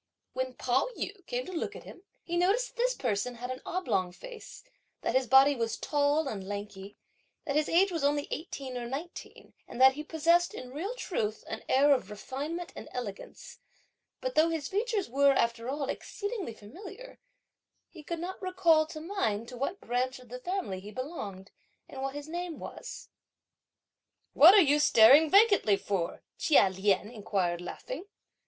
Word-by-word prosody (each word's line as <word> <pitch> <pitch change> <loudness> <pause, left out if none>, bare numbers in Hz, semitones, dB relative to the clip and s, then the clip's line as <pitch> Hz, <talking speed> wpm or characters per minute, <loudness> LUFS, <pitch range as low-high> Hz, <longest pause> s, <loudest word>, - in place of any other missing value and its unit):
When 260 0 -3
Pao 255 +1 +1
yü - - -5
came - - -2
to - - -8
look 335 - -3
at - - -9
him, - - -12 0.2
he 345 - -4
noticed 405 +8 +2
that - - -26
this - - +1
person 245 +1 -2
had 245 +2 -5
an 255 - -6
oblong 195 - -1
face, 470 - -11 0.4
that - - -1
his 260 -1 +2
body 270 +3 +6
was 230 -2 -2
tall 290 +1 +1
and 210 -7 -4
lanky, 205 -1 -7 0.5
that 280 - -2
his 305 0 +2
age 375 +3 +4
was 330 -4 -2
only 290 0 +1
eighteen 275 -6 -5
or 240 - -5
nineteen, 295 +8 -8
and 240 - -9
that 265 0 +8
he 300 +3 -6
possessed, 335 +3 +2
in 250 0 -8
real 385 - -4
truth, 220 - -3
an 220 - -5
air 285 +2 +5
of 270 - -2
refinement 290 +11 -5
and - - -9
elegance; 225 -6 -7 0.6
but - - -2
though 320 +2 +4
his 320 -4 -2
features 425 0 -1
were, 275 +3 +4
after 235 -1 0
all, 280 0 -2
exceedingly 405 - -5
familiar, 380 - -11 0.7
he - - -13
could 340 +3 -5
not 370 +3 -6
recall 350 -4 +3
to 310 -1 -8
mind 235 - -2
to 250 - -9
what 275 +10 -3
branch 255 +2 -1
of 250 -2 -16
the 250 +1 -7
family 350 - -3
he 200 +2 -10
belonged, 215 - -7 0.4
and 265 - -8
what 270 +1 -3
his 290 0 -6
name 345 0 -5
was. - - -9 1.2
"What 340 +7 +9
are 410 - +8
you 295 0 +3
staring 290 +3 +7
vacantly 400 - +5
for?" 190 -5 -3 0.2
Chia 280 -11 +5
Lien 200 +3 0
inquired 190 -6 -1
laughing. 260 - -7
280 Hz, 175 wpm, -30 LUFS, 235-345 Hz, 1.2 s, What